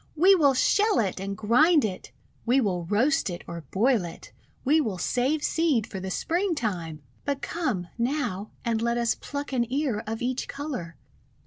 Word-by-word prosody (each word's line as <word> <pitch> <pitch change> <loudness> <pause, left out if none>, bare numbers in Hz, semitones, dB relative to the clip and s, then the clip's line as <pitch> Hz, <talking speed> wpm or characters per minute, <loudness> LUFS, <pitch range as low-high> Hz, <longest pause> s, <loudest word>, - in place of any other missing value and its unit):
We 365 +5 +6
will 290 -7 +4
shell 415 - +3
it 195 -4 0
and 195 0 -4
grind 275 +8 +4
it! 190 -3 -5 0.3
We 250 +3 +3
will 180 -8 0
roast 245 - +2
it 175 - -6
or 170 -2 -7
boil 230 +1 +2
it! 170 -1 -9 0.3
We 305 +4 +4
will 215 -9 -2
save 265 +10 0
seed 305 -10 +2
for 195 - -7
the 190 +1 -5
Springtime! 215 - -2 0.2
"But 280 -1 -2
come, 255 - -2
now, 235 -6 -1 0.2
and 230 -1 0
let 235 +1 +1
us 235 -1 +2
pluck 285 -1 -6
an 240 -2 0
ear 265 -6 0
of 225 +2 -3
each 255 +1 -2
colour. 270 - -5
240 Hz, 175 wpm, -26 LUFS, 195-290 Hz, 0.3 s, We